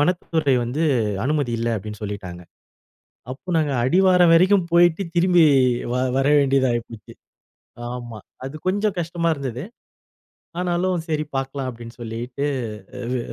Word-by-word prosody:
வனத்துறை 160 -3 +1
வந்து 135 +7 -2 0.4
அனுமதி 145 -4 0
இல்ல, 115 +1 -1
அப்படின்னு 105 +1 -7
சொல்லிட்டாங்க. 95 -4 -6 0.9
அப்போ 140 +8 -9
நாங்க 150 -3 0
அடிவாரம் 180 +3 +5
வரைக்கும் 185 +1 +4
போயிட்டு, 175 +1 +4
திரும்பி 175 -1 +5 0.5
வ - - 0 0.2
வரவேண்டியதா 135 -2 +3
ஆயிப்போச்சு. 115 -2 -7 0.8
ஆமா. 120 -3 -7 0.3
அது 135 - -7
கொஞ்சம் 205 +1 0
கஷ்டமா 170 0 -1
இருந்தது. 130 -2 -5 1.0
ஆனாலும் 175 -1 -1
சரி 155 -1 -1
பார்க்கலாம், 135 0 -3
அப்படின்னு 115 0 -11
சொல்லிட்டு. 120 +5 -4 0.7
வு 125 - 0
145 Hz, 115 wpm, -22 LUFS, 120-175 Hz, 1.0 s, அடிவாரம்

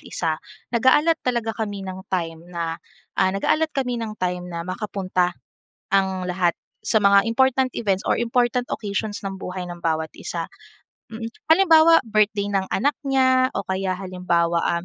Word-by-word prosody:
isa, 160 -2 -3 0.3
nag-a-allot 295 +7 +4
talaga 235 -3 -1
kami 205 -3 -4
ng 190 0 -6
time 165 -3 -2
na, 170 -1 -4 0.4
ah, 190 - +4
nag-a-allot 305 +11 +1
kami 250 -3 -1
ng 215 -2 -5
time 180 -1 -3
na 170 -1 -5
makapunta 185 -2 -2 0.5
ang 190 -2 +1
lahat 175 -1 +1 0.3
sa 220 - +3
mga 200 0 +5
important 260 +2 +2
events 195 -3 -1
or - - +2
important 240 +1 0
occasions 205 0 -3
ng 195 -1 -5
buhay 180 0 -5
ng 175 -1 -8
bawat 160 -1 -1
isa - - -4 0.6
mm. 225 0 -7 0.2
Halimbawa, 330 -2 +6
birthday 210 -2 +1
ng 190 -1 0
anak 285 +2 +1
niya 260 -2 +3
o 200 - -2
kaya 190 0 -2
halimbawa, 180 -3 0 0.2
um, 170 - -4
200 Hz, 155 wpm, -23 LUFS, 180-240 Hz, 0.6 s, Halimbawa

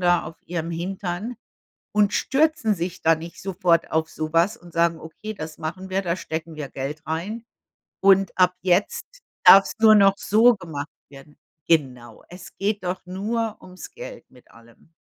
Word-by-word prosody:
da 175 -1 +2
auf 160 +1 -9
ihrem 170 -1 -4
Hintern 190 +5 -4 0.6
und 210 -1 +2
stürzen 300 -6 +1
sich 175 +1 -5
da 165 0 +4
nicht 165 +2 -10
sofort 180 -3 +1
auf 160 0 0
sowas 165 +8 0
und 175 -1 -16
sagen: 170 -1 +1
„Okay, 215 +7 -8
das 155 -2 -8
machen 180 +4 -6
wir, 195 +1 +1
da 170 0 -1
stecken 160 -2 -6
wir 150 -2 -5
Geld 145 +3 -5
rein, 205 +9 -4 0.5
und 195 -1 +4
ab 180 0 +4
jetzt 185 +2 +1 0.4
darf's 195 0 +8
nur 220 -1 +7
noch 195 -1 +5
so 225 +4 +4
gemacht 160 -6 -7 0.2
werden.“ 140 +1 -15 0.3
Genau, 125 -8 -1
es 180 +1 -12
geht 205 0 -1
doch 180 0 -4
nur 215 +4 -3
ums 185 0 -11
Geld - - -10
mit 125 -1 -21
allem. 115 +7 -21
180 Hz, 165 wpm, -23 LUFS, 160-200 Hz, 0.6 s, darf's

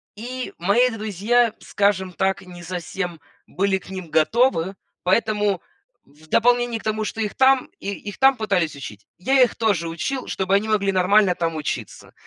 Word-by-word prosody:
И 250 +4 -6
мои 210 +8 +3
друзья, 220 +2 +1
скажем 190 -2 0
так, 190 +1 0
не 180 -2 -12
совсем 175 0 -5 0.3
были 195 +1 0
к 190 - -16
ним 185 -4 -7
готовы, 195 +1 +2 0.3
поэтому 205 -1 +1 0.4
в 150 +3 -21
дополнение 240 +4 +2
к - - -15
тому, 215 0 -1
что 225 - -4
их 210 -2 -2
там 265 0 +4
и - - -5
их 205 0 -8
там 270 +1 +6
пытались 185 -8 0
учить, 105 -7 -10
я 265 +9 +3
их 250 - +3
тоже 200 -7 0
учил, 255 +11 -3
чтобы 190 0 -1
они 210 +2 +1
могли 205 -2 +1
нормально 190 +1 +4
там 165 -1 -2
учиться. 155 -1 -5
200 Hz, 165 wpm, -22 LUFS, 180-225 Hz, 0.4 s, там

